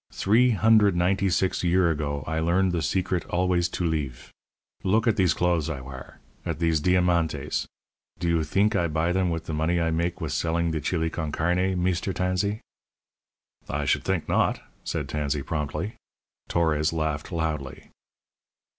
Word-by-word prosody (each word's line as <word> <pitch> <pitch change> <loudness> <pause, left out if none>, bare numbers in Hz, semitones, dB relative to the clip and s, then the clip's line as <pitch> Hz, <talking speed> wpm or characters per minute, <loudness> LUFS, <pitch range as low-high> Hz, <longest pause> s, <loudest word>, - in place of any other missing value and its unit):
Three 115 +6 +3
hundred 110 -3 +4
ninety 95 +3 +2
six 95 +1 0
year 90 -1 +3
ago 70 -2 -2
I 80 +1 -2
learn 90 +4 +2
the 85 -2 -1
secret 90 +3 0
always 90 -1 +1
to 90 - -2
leeve. 75 -7 -3 0.5
Look 110 +4 +2
at 115 -3 +3
these 90 -6 +2
clothes 85 -3 +1
I 75 -5 -3
war 65 0 -10 0.3
at - - -3
these 80 -2 +1
diamantes. 85 -4 +1 0.5
Do 85 +2 -3
you 85 -1 +2
theenk 100 +8 +1
I 85 -3 +2
buy 80 +2 0
them 95 0 +1
with 80 -1 -3
the 80 - -4
money 80 +3 +1
I 80 -1 +1
make 85 +2 -1
with 80 -4 -3
selling 85 +2 0
the 80 -1 -2
chili 80 +1 -1
con 80 -3 -3
carne, 90 +4 0
Meester 95 +1 0
Tansee?" 95 +4 -1 1.1
"I - - -2
should - - +1
think - - -1
not," - - +1 0.2
said - - -3
Tansey, 75 -2 -2
promptly. 75 - -3 0.6
Torres 80 -2 +1
laughed 80 -1 -2
loudly. 80 -5 -3
85 Hz, 165 wpm, -26 LUFS, 80-90 Hz, 1.1 s, hundred